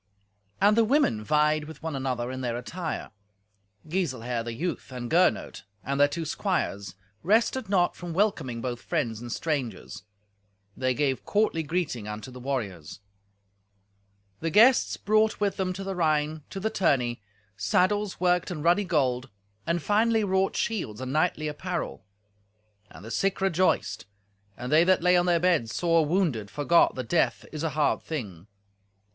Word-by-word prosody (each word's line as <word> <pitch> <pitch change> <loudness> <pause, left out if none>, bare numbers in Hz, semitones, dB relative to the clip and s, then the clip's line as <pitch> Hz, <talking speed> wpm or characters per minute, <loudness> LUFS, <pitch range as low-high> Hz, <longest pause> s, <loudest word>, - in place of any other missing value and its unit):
And 205 +2 +5
the 230 - +5
women 220 - +2
vied 150 +3 +2
with 160 +1 -11
one 160 -3 -3
another 130 -2 -2
in 130 0 -5
their 120 -2 -2
attire. 160 +7 -5 0.8
Giselher, 130 -9 -2
the 120 - -5
youth, 160 +4 -4
and 125 -2 -6
Gernot, 175 +2 +2 0.2
and 140 +1 -2
their 145 - +6
two 160 +3 -4
squires, 100 - -2 0.3
rested 225 +5 +1
not 180 -3 +2
from 175 -1 -7
welcoming 160 - 0
both 120 -1 -4
friends 115 -2 -2
and 120 -1 -7
strangers. 130 - -3 0.7
They 130 -1 0
gave 135 -2 0
courtly 210 -6 +1
greeting 150 - -2
unto 105 +5 -7
the 125 - -10
warriors. 105 - -4 1.4
The 165 - -1
guests 235 +9 +5
brought 215 +1 +2
with 205 -1 0
them 185 -1 -1
to 195 +2 -6
the 195 0 -3
Rhine, 155 -3 0
to 195 - -6
the 220 +3 -1
tourney, 125 - +1 0.3
saddles 190 - +1
worked 180 -1 +2
in 160 -5 -5
ruddy 175 +5 +3
gold, 135 -7 0 0.4
and 170 -1 0
finely 220 +1 +2
wrought 190 -1 +1
shields, 180 - -2
and 130 0 -4
knightly 155 -1 +1
apparel. 170 - -4 0.9
And 100 - -13
the 115 - -8
sick 195 +7 0
rejoiced, 185 - +1 0.5
and 125 +1 -5
they 155 +2 +6
that 185 -1 +3
lay 180 0 +5
on 175 0 +3
their 170 -1 +3
beds 165 -11 +1
sore 165 -2 +3
wounded 150 - 0
forgot 145 - +3
that 130 -2 -5
death 170 - +1
is 155 - -5
an 160 -3 -2
hard 150 -1 +1
thing. 105 - -6
155 Hz, 160 wpm, -27 LUFS, 125-185 Hz, 1.4 s, their